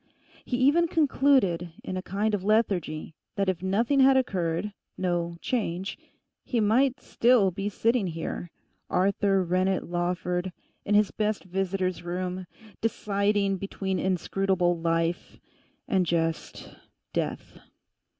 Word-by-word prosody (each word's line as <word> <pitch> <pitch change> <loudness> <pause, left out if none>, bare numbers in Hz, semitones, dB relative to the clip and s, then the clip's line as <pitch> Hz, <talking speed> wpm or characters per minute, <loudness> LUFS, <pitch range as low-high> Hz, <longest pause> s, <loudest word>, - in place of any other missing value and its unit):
He 245 - -1
even 290 +7 +4
concluded 265 - +2
in 185 - -4
a 185 - -2
kind 205 +4 -1
of 200 -3 -1
lethargy 195 -8 0 0.2
that 195 -1 +1
if 180 -2 -2
nothing 225 +9 +1
had 265 0 +6
occurred, 190 -5 -1 0.2
no 175 -2 -1
'change,' 195 -6 -2 0.5
he 240 - -1
might 250 +5 +3
still 235 -7 +3
be 195 +3 -3
sitting 230 0 +1
here, 165 +1 -5 0.4
Arthur 195 +1 +2
Rennet 185 +1 0
Lawford, 180 +1 -2 0.3
in 205 - +2
his 210 -1 +4
best 215 -1 -1
visitor's 185 0 -2
room, 180 +1 -4 0.3
deciding 200 -2 +1
between 190 0 -3
inscrutable 185 -1 +1
life 165 0 -1 0.5
and 190 -2 +2
just—death. 165 -1 -4
190 Hz, 115 wpm, -27 LUFS, 175-215 Hz, 0.5 s, had